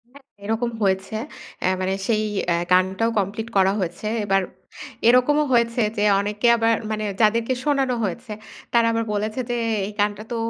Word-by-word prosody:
হ্যাঁ। 275 +2 -17 0.2
এরকম 225 +3 -1
হয়েছে। 190 +1 0 0.5
অ্যা - - +1
মানে 185 +1 0
সেই 215 -2 +1 0.3
এ্যা 170 - +3 0.2
গানটাও 190 +5 +3
কমপ্লিট 205 +3 -3
করা 190 0 +4
হয়েছে। 175 +2 -4 0.2
এবার 195 -1 +2 0.7
এরকমও 255 +5 +4
হয়েছে 235 0 +2 0.2
যে, 205 - +1 0.2
অনেকে 205 +3 -1
আবার 230 0 +3 0.2
মানে 215 0 -2 0.2
যাদেরকে 230 +3 +2
শোনানো 270 -4 +1
হয়েছে 215 +4 -4 0.4
তারা 235 -1 +4
আবার 230 0 0
বলেছে 215 +3 -2
যে, 240 - 0 0.3
এই - - -6
গানটা 205 +1 0
তো - - -2
215 Hz, 160 wpm, -22 LUFS, 200-235 Hz, 0.7 s, করা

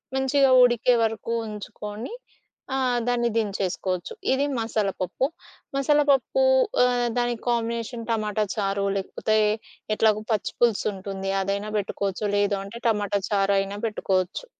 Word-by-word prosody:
మంచిగా 265 +1 +3
ఉడికే 245 0 +4
వరకు 225 +1 -2 0.2
ఉంచుకొని. 210 - -7 0.6
ఆ! - - +1 0.3
దాన్ని 240 -1 +1
దించేసుకోవచ్చు. 190 -4 -2 0.2
ఇది 275 +2 +1
మసాలాపప్పు. 210 -1 -1 0.5
మసాలాపప్పు 290 - +3 0.4
ఆహ్, 245 -1 +2
దానికి 240 -1 0
కాంబినేషన్ 230 0 -2
టమాటా 215 -1 0
చారు 200 -1 0
లేకపోతే 215 +3 -1 0.6
ఎట్లాగో 215 -1 +2
పచ్చి 205 - -2
పులుసుంటుంది 195 -4 0
అదైనా 200 +2 -2
బెట్టుకోవచ్చు 200 0 -2
లేదు 205 0 +2
అంటే 205 +4 -9
టమాటా 205 -2 0
చారైనా 195 0 +1
బెట్టుకోవచ్చు. 190 - -1
215 Hz, 105 wpm, -25 LUFS, 200-240 Hz, 0.6 s, ఉడికే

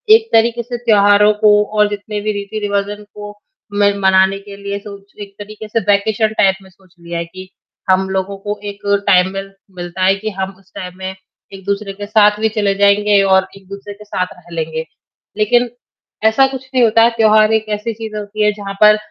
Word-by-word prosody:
एक 450 0 +1
तरीके 235 +1 +3
से 240 +1 -5
त्याेहारों 210 -2 +4
को 215 - +6 0.3
और 210 0 +5
जितने 205 +1 -5
भी 215 - -1 0.3
रीति-रिवाज़ 205 0 -2
को, 205 0 -9 0.4
मैं 205 0 +3
मनाने 190 0 +3
के 200 0 -11
लिए 200 0 -5
सोच 200 0 -12
एक 200 -1 -9
तरीके 215 +1 -9
से 220 +2 0
वेकेशन 210 +2 +2
टाइप 195 -1 +4
में 190 - -17
सोच 185 0 -26
लिया 170 0 -6
है। 170 - -3
कि 185 +2 -12 0.4
हम 190 +1 +2
लोगों 190 +1 -2
को 205 +1 -5
एक 200 - -10 0.3
टाइमवेल 195 +1 +2 0.2
मिलता 175 +1 -5
है, 190 +1 +4
कि 215 +2 -5
हम 190 -1 -4
उस 195 - -27
टाइम 180 0 -7
में 190 0 -6 0.4
एक-दूसरे 200 +1 -4
के 205 +1 -7
साथ 210 0 +3
भी 220 0 +1
चले 205 -2 0
जाएँगे 200 0 +4
और 190 -1 +3
एक-दूसरे 200 +1 -10
के 205 +1 -14
साथ 185 -3 -2
रह 175 -1 -18
लेंगे। 160 0 -3 0.5
लेकिन 240 +3 +2 0.6
ऐसा 220 +5 +5
कुछ 265 -1 -8
नहीं 255 -2 +3
होता, 230 0 +5
त्योहार 215 -2 +4
एक 220 0 +1
ऐसी 215 +2 -4
चीज़ 220 0 -8
होती 210 +1 -3
है, 210 - +4
जहाँ 200 -1 -7
पर 210 0 +7
205 Hz, 195 wpm, -16 LUFS, 195-215 Hz, 0.6 s, पर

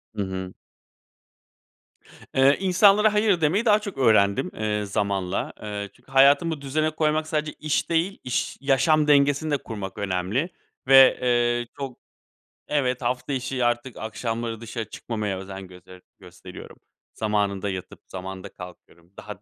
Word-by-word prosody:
Hı 105 - -2
hı. 95 -1 -5 1.8
Eee, 135 +2 +5
insanlara 200 +3 +4
hayır 210 -4 +2
demeyi 180 +10 +2
daha 210 -2 +5
çok 205 -6 -7
öğrendim, 105 -6 +3
eee, 105 -1 -2
zamanla. 100 -1 -2
Eee, 105 -1 -5
çünkü 125 +2 -23
hayatımı 140 +3 +4
düzene 155 +3 0
koymak 155 0 0
sadece 155 -1 -2
iş 155 -1 -2
değil, 170 +4 0
iş 125 - -2
yaşam 145 +3 +3
dengesini 145 +1 +3
de 145 - +2
kurmak 100 -6 -7
önemli 100 - -1 0.4
ve, 135 -1 +8
eee, 120 -1 +1
çok 135 -3 -6 0.7
Evet, 130 -4 0
hafta 125 +3 -2
içi 130 -1 -2
artık 120 +1 -1
akşamları 115 +1 -4
dışarı 115 -1 -6
çıkmamaya 105 -4 -4
özen 95 0 -8
göster 90 0 -15 0.2
gösteriyorum. - - -12 0.4
Zamanında 105 -2 -1
yatıp 95 -1 -7
zamanında 95 +1 -7
kalkıyorum, 90 -1 -14
daha - - -9
120 Hz, 135 wpm, -24 LUFS, 100-150 Hz, 1.8 s, ve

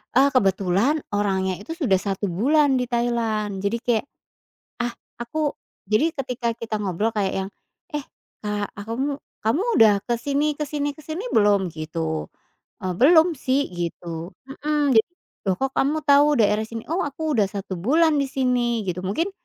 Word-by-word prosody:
Eee, 275 +2 +6
kebetulan 200 - +2
orangnya 190 -2 0
itu 210 - -9
sudah 235 - +2
1 195 0 -2
bulan 275 - +3
di 250 - -1
Thailand, 225 -4 -1
jadi 200 +4 0
kayak, 235 0 +1 0.8
ah, 240 0 -1 0.3
aku 295 +4 -2 0.3
jadi 215 +11 +2
ketika 250 -2 -2
kita 225 -1 -4
ngobrol 200 +3 0
kayak 195 -2 0
yang, - - -7 0.5
"Eh, 295 - -1 0.4
Kak, 210 -1 -2
ah, 200 - -7
kamu 275 +5 -2 0.2
kamu 230 - +1
udah 215 -2 +7
ke 240 - +1
sini, 285 +5 0
ke 300 - 0
sini, 290 0 -2
ke 310 - -14
sini 330 +10 -5
belum?" 205 -3 +4
gitu, 80 - -3 0.6
eee, 185 -1 -2
"belum, 320 - +7
sih." 265 +2 +1
Gitu, 170 0 -5 0.2
mhm, 295 -1 0
d - - +5 0.5
"loh, 190 -2 +2
kok, 270 0 0
kamu 300 +3 +2
tau 290 +1 +6
daerah 215 0 +3
sini? 225 0 -7
'Oh 345 +3 0
aku 305 +2 -2
udah 210 - +4
1 200 -1 -5
bulan 305 - +3
di - - +1
sini'" 245 -4 0
gitu 180 -1 -3
mungkin 320 - 0
235 Hz, 165 wpm, -23 LUFS, 200-285 Hz, 0.8 s, udah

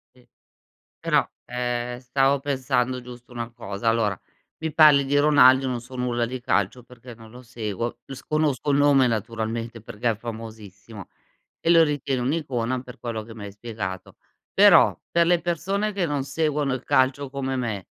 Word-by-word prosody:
Sì - - -23 0.7
però, - - +1 0.2
ehm, 120 0 -3
stavo 135 +2 +1
pensando 130 -2 -1
giusto 125 0 -13
una 120 -1 -5
cosa. 110 -1 -4
Allora 110 -4 +1 0.4
mi 160 -1 -4
parli 150 -3 +7
di 145 +1 +1
Ronaldo, 135 -3 +6
non 125 -2 -2
so 125 +2 -13
nulla 120 -1 -1
di 125 +2 -6
calcio 105 +1 0
perché 120 0 -13
non 110 -1 -15
lo 125 +2 -12
seguo, 115 -2 -5
s 135 -1 -8
conosco 150 -3 0
il 140 - +3
nome 145 -2 +5
naturalmente 115 0 -3
perché 115 +2 -2
è 110 - -2
famosissimo, 110 -3 -9 0.5
e 165 - +1
lo 165 -1 +7
ritieni 140 -3 -2
un'icona 130 -3 -2
per 125 +1 -12
quello 115 -2 -4
che 115 +1 -12
mi 110 -2 -9
hai 100 - -8
spiegato. 105 -4 -7 0.4
Però - - +6
per 170 0 +3
le 175 0 +3
persone 195 +5 -1
che 195 -3 -1
non 145 -3 -2
seguono 150 -2 -1
il 130 - -6
calcio 130 +1 +1
come 135 -1 -3
me, 110 -7 -3
125 Hz, 170 wpm, -24 LUFS, 115-140 Hz, 0.7 s, parli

